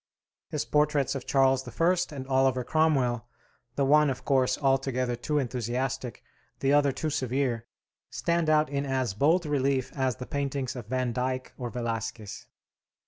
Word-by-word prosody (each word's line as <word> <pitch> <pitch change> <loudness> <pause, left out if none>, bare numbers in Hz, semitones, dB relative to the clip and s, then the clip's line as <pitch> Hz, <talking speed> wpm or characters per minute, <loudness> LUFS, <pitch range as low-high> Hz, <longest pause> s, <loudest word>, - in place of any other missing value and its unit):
His - - -2
portraits 150 -2 +2
of 135 -2 -6
Charles 135 -1 +3 0.2
I. 175 +2 +4 0.2
and 130 -1 -6
Oliver 130 -1 +2
Cromwell 130 -6 +1 0.5
the 140 - +1
one, 150 +1 +5
of 130 -2 -5
course, 130 -2 +2
altogether 135 -3 +1
too 150 +5 -2
enthusiastic, 125 0 -2 0.4
the 135 +1 +2
other 145 -1 +4
too 155 +4 -3
severe 130 -3 -1 0.4
stand 170 -2 0
out 155 0 +4
in 140 0 -2
as 130 -6 -1
bold 160 - +2
relief 135 -3 0
as 130 -3 0
the 125 - -7
paintings 140 -2 -3
of 120 -4 -7
Van 130 0 -1
Dyck 130 +1 -2
or 125 -2 -5
Velasquez. 115 -3 -5
135 Hz, 150 wpm, -28 LUFS, 125-140 Hz, 0.5 s, one